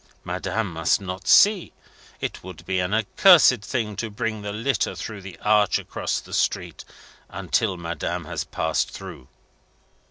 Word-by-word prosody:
Madame 95 +2 -3
must 80 -1 +1
not 95 -1 -7
see. 205 -3 +5 0.5
It - - -5
would 95 0 -10
be 95 -1 -1
an 90 +1 -1
accursed 125 - +5
thing 105 -1 -3
to 115 +2 -3
bring 110 0 -3
the 105 0 -5
litter 115 +6 -1
through 110 -3 -7
the 95 -3 -10
arch 105 -1 +3
across - - -3
the - - -13
street, - - -1 0.5
until 95 +2 -1
Madame 85 0 -4
has - - -4
passed 80 0 -1
through. 65 - -10
105 Hz, 150 wpm, -24 LUFS, 90-115 Hz, 0.5 s, see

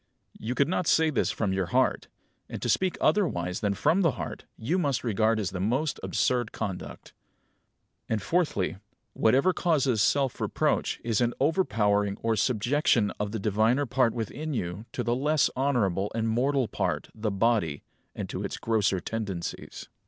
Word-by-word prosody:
You 120 +3 -3
could 140 - +3
not 180 0 -1
say 160 -1 +4
this - - +1
from 100 -4 -1
your 95 -2 -1
heart; - - +1 0.4
and - - -5
to - - -1
speak 185 -1 +1
otherwise 90 - +1
than 100 -1 0
from 180 - +2
the 165 -7 +3
heart - - -6
you 165 +12 0
must 140 -8 0
regard 110 -1 +1
as 100 -3 -2
the 95 - -5
most 130 +10 0
absurd 120 -3 0
conduct." 100 -5 -6 1.0
And, 110 - +1
fourthly, 150 - 0 0.4
whatever 135 +11 +3
causes 140 - +1
self 130 +5 +1
reproach - - 0
is 115 -2 0
an 120 0 +1
overpowering 105 - +1
or 115 -1 +2
subjection 120 0 +2
of 105 -1 -2
the 115 - -2
diviner 110 +7 +2
part 125 -1 +1
within 140 +6 -4
you 90 +1 -4
to - - -2
the 120 - +1
less 150 +3 +2
honourable 105 -8 0
and 115 0 0
mortal 130 +3 +1
part, - - -2
the 110 0 -2
body, 100 -7 +1 0.3
and - - -4
to - - -4
its - - -4
grosser 105 -4 +1
tendencies. 100 -4 -5
115 Hz, 165 wpm, -27 LUFS, 105-140 Hz, 1.0 s, say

